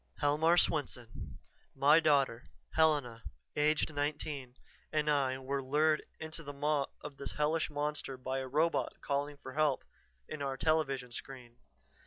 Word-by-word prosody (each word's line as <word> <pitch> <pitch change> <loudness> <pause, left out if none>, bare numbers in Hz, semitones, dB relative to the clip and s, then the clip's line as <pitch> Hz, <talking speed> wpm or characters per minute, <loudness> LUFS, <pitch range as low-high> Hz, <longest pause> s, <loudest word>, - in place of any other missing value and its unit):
"Helmar 155 +4 +3
Swenson. 120 - -1 0.4
My 150 +3 +6
daughter, 140 -6 +2 0.2
Helena, 145 -8 +2 0.3
aged 150 +1 +2
nineteen, 145 -3 -3 0.4
and 150 -1 +1
I 135 -3 +2
were 135 +1 -2
lured 150 +3 +2 0.2
into 160 +1 -5
the 145 -2 -7
maw 145 0 +1
of 145 -2 -8
this 140 - -4
hellish 155 +2 +1
monster 150 -2 -2
by 130 +1 -2
a 130 - -4
robot 155 +5 +1
calling 145 +1 -1
for 130 -2 -9
help 150 -2 +2 0.4
in 155 - -6
our 135 -1 -2
television 135 -5 +1
screen. 120 -1 -9
145 Hz, 140 wpm, -33 LUFS, 130-155 Hz, 0.4 s, My